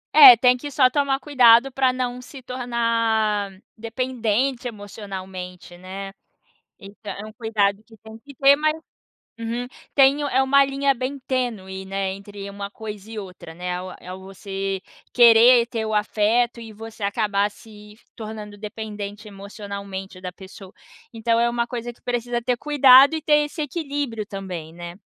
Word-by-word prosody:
É, 265 -6 +11
tem 250 +1 +4
que 290 +4 -7
só 255 -2 +3
tomar 275 -1 +1
cuidado 255 -2 +5
para 260 0 +2
não 250 -1 -3
se 265 +2 -11
tornar 230 -4 0 0.3
dependente 245 +1 -2
emocionalmente, 190 -4 -8
né. 195 +2 -8 0.7
Então, 205 +1 -10
é 205 - -8
um 215 - -12
cuidado 215 -2 0
que 225 -1 -18
tem 220 +1 -13
que 280 +2 -15
ter, 275 +2 +6
mas 310 0 +1 0.7
uhum 235 +2 -3 0.3
tem 275 +1 +5
é 265 -2 +2
uma 275 +1 +5
linha 275 0 +1
bem 260 +3 -4
tênue, 205 -7 -3
né, 195 0 -2
entre 200 0 -9
uma 200 0 -7
coisa 215 -1 -9
e 220 - -5
outra, 180 -4 -10
né. 180 +1 -7 0.3
É - - -14
é 185 - -6
você 195 0 -5 0.3
querer 235 0 +7
ter 225 -3 -3
o 220 - -3
afeto 220 +3 +1
e 220 -1 -10
você 225 0 -10
acabar 205 0 0
se 210 -1 -15 0.2
tornando 215 -2 -8
dependente 210 0 -7
emocionalmente 200 -1 -8
da 180 -1 -5
pessoa. 190 0 -13 0.4
Então 230 0 +1
é 235 - +3
uma 235 0 -1
coisa 240 0 -5
que - - -29
precisa 240 -1 -2
ter 245 0 0
cuidado 275 0 +6
e 315 - -3
ter 295 -1 +3
esse 305 +2 -6
equilíbrio 285 -7 -3
também, 185 -6 -7
né. 175 0 -9
225 Hz, 160 wpm, -22 LUFS, 200-250 Hz, 0.7 s, É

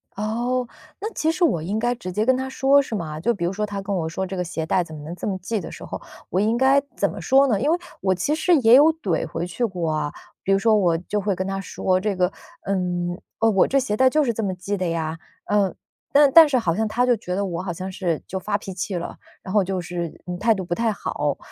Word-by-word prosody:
哦， 240 +5 -1 0.4
那 430 +2 -3
其 315 - 0
实 360 +2 -1
我 175 - +3
应 190 +7 -2
该 240 +2 +1
直 185 -6 -6
接 210 +4 0
跟 260 +1 +3
他 260 0 -3
说， 270 +1 +4
是 250 -5 -5
吗？ 155 -5 -4
就 235 +9 +1
比 200 - -5
如 175 - +1
说， 210 +2 -2
他 200 -1 -5
跟 200 +1 -3
我 170 -4 -1
说 190 +4 -3
“这 190 0 -5
个 180 - 0
鞋 165 -2 -4
带 180 +3 +2
怎 160 -2 -10
么 150 - -9
能 160 +3 -6
这 - - -5
么 195 -2 -1
系” 220 +4 -2
的 180 - -7
时 - - -10
候， - - -6 0.3
我 185 - 0
应 215 +3 +2
该 265 +2 +4
怎 - - +1
么 - - -8
说 275 +1 +4
呢？ 215 -6 +1
因 285 - +1
为 335 - +3 0.2
我 190 -1 +1
其 185 +12 0
实 320 +3 +3
也 235 -3 +6
有 300 +4 +7
怼 195 - -2
回 170 - -3
去 180 +8 -2
过 175 -6 -2
啊， 155 -1 -1 0.3
比 195 - +2
如 195 - +3
说 225 +2 +3
我 175 -5 +2
就 195 +5 -3
会 200 -1 0
跟 185 - -3
他 195 0 -3
说 185 -1 0
这 205 +1 -1
个， 180 0 +1 0.3
嗯， 180 -2 -1 0.2
“我 220 -4 +4
这 275 - +1
鞋 230 -5 -1
带 260 +2 +5
就 305 +3 +2
是 250 - +1
这 225 - -3
么 195 -3 -1
系 200 +3 -3
的 185 -1 -1
呀”， 165 -1 -2 0.3
呃， 205 -2 +1 0.4
但 285 -1 +6
但 325 +2 +9
是 275 -3 +2
好 180 -9 +1
像 220 +2 0
他 240 +4 +1
就 250 -1 +4
觉 180 -3 -4
得， 200 +1 0
我 175 -2 -3
好 185 -2 -4
像 185 +3 -6
是 175 -4 -2
就 190 - -4
发 205 +2 -1
脾 195 -2 -8
气 185 +1 -3
了， 175 -1 -5 0.3
然 190 - -6
后 205 -2 +4
就 185 0 -2
是， 175 -1 -5
嗯， 180 0 -3
态 225 +3 +4
度 190 - -4
不 175 -1 -3
太 230 +4 +1
好。 145 -7 -2
195 Hz, 295 characters per minute, -23 LUFS, 180-235 Hz, 0.4 s, 但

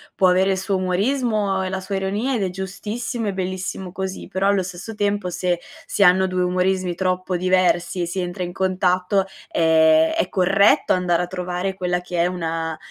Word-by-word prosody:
può 185 - +4
avere 185 +2 +3
il 190 - 0
suo 195 +1 -1
umorismo 200 +1 0
e 185 - -2
la 190 0 -3
sua 190 +1 -5
ironia 205 +7 -1
ed 215 - 0
è 190 - 0
giustissimo 210 +5 -4
e 200 - -1
bellissimo 185 0 -4
così, 190 +1 -5
però, 190 +1 -1
allo 200 -1 +2
stesso 185 +4 -7
tempo, 205 -2 -1
se 175 0 -1 0.3
si 200 - +2
hanno 190 0 +5
2 185 -1 0
umorismi 180 0 0
troppo 185 0 -1
diversi, 185 0 +1
si 175 +3 -4
entra 180 0 -3
in 175 0 -5
contatto, 185 0 +1 0.3
ehm, 160 -1 +4
è 185 - 0
corretto 195 +2 +3
andare 180 -1 +1
a - - -4
trovare 180 +1 -3
quella 180 -1 -1
che 180 0 -6
è 170 - +4
una 165 -2 -3
185 Hz, 185 wpm, -21 LUFS, 180-195 Hz, 0.3 s, hanno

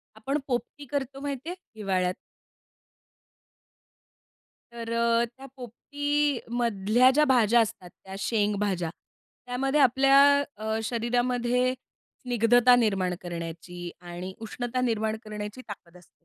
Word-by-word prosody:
आपण 265 +7 -2
पोपटी 270 +3 -3
करतो 270 -1 -3
माहिती 285 +1 -4
आहे, 355 - -4 0.2
हिवाळ्यात? 185 -3 0 2.6
तर 230 -1 -6
अ, 235 0 +2
त्या 255 +3 -14
पोपटीमधल्या 245 -4 0
ज्या 300 +3 +3
भाज्या 240 -4 +4
असतात, 220 -5 -4
त्या 190 0 -9
शेंगभाज्या. 205 -3 0 0.6
त्यामध्ये 270 +4 0
आपल्या 270 +1 +5 0.4
अ, 220 +1 -2
शरीरामध्ये 245 +2 0 0.5
स्निग्धता 245 +1 +5
निर्माण 195 -6 +1
करण्याची 175 0 -7
आणि 175 +1 -7
उष्णता 245 +3 -3
निर्माण 220 -3 0
करण्याची 210 +2 -7
ताकद 180 -4 -10
असते. 175 -1 -23
235 Hz, 105 wpm, -27 LUFS, 205-255 Hz, 2.6 s, आपल्या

